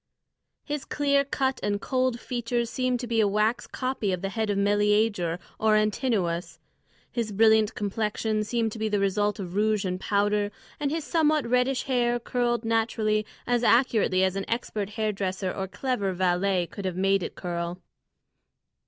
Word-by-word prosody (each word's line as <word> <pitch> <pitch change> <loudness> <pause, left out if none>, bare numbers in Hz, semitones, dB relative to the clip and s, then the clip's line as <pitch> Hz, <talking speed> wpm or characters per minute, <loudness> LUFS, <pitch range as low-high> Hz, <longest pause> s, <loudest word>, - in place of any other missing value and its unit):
His 295 -2 -3
clear 280 -1 +2
cut 265 -1 -1
and 205 0 0
cold 255 0 0
features 240 -1 -2
seemed 255 -1 0
to - - -3
be 230 -1 0
a 215 - +4
wax 215 +4 +1
copy 255 -6 -2
of 185 0 -3
the 195 - -1
head 220 +1 -2
of 205 - 0
Meleager 205 -3 +2 0.2
or 215 -1 +4
Antinoüs; 215 -5 0 0.5
his 230 -3 -2
brilliant 220 +1 +4
complexion 215 +1 -1
seemed 225 +1 -1
to 220 - -7
be 220 0 0
the 210 - +1
result 205 +1 +1
of 180 -4 -6
rouge 210 0 +1
and 185 0 -2
powder, 205 +1 +1 0.3
and 290 -2 0
his 320 +2 -2
somewhat 310 -3 +2
reddish 250 +2 +1
hair 240 -2 +1
curled 240 -1 -1
naturally 220 -1 +1 0.2
as 245 -1 +1
accurately 230 -6 +3
as 190 0 +1
an 195 - -2
expert 215 -4 -2
hairdresser 200 -3 -2
or 190 -1 -3
clever 205 -3 -2
valet 180 0 +1
could 195 +3 -8
have 185 -1 -2
made 195 +1 +2
it - - -5
curl. 175 0 -4
215 Hz, 165 wpm, -26 LUFS, 195-240 Hz, 0.5 s, a